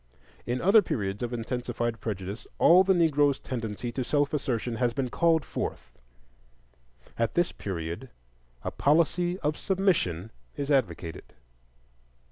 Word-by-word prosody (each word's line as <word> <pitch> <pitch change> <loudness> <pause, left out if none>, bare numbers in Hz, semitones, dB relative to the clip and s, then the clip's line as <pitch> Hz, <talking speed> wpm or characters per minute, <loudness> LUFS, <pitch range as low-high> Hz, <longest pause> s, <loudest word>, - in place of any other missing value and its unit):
In 125 +1 -1
other 205 +4 +6
periods 100 - -3
of 120 -1 -2
intensified 120 -1 -3
prejudice 100 0 -5
all 180 +3 +7
the 190 0 +3
Negro's 145 -5 +3
tendency 115 -1 -4
to 130 - -2
self 145 +3 +1
assertion 120 -5 -1
has 120 -1 0
been 130 -3 -2
called 165 -3 +2
forth; - - -5 1.3
at 115 - 0
this 175 0 +2
period 85 -3 -5 0.5
a - - -3
policy 170 +4 +2
of 150 -1 0
submission 160 - 0 0.2
is 140 0 -3
advocated. 85 - -1
125 Hz, 125 wpm, -28 LUFS, 110-160 Hz, 1.3 s, all